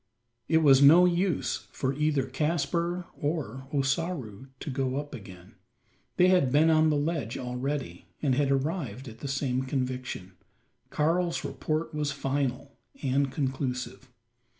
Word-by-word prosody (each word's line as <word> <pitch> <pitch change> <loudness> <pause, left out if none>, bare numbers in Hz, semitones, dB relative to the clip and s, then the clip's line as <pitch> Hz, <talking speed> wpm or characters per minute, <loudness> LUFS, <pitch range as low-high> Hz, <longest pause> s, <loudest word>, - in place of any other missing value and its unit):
It 160 0 +3
was 135 -2 +7
no 165 +6 +8
use 175 - 0
for 130 0 -1
either 150 -2 +1
Caspar 170 +5 -1
or 140 -5 -3
Ossaroo 135 - -2
to - - -6
go 130 -1 -1
up 145 +1 -4
again. 95 -1 -11 0.6
They 180 0 +6
had 180 -9 +3
been 155 +4 +5
on 155 0 +4
the 150 - +2
ledge 145 -5 -2
already; 125 -5 -4
and 140 -4 +1
had 140 +1 +2
arrived 135 - -2
at 115 -1 -10
the 140 - -5
same 135 -2 -1
conviction. 130 -7 -3 0.6
Karl's 170 +3 0
report 155 +1 -2
was 150 -1 -1
final 135 -1 -2 0.3
and 135 0 +1
conclusive. 130 -2 -3
140 Hz, 135 wpm, -28 LUFS, 130-155 Hz, 0.6 s, no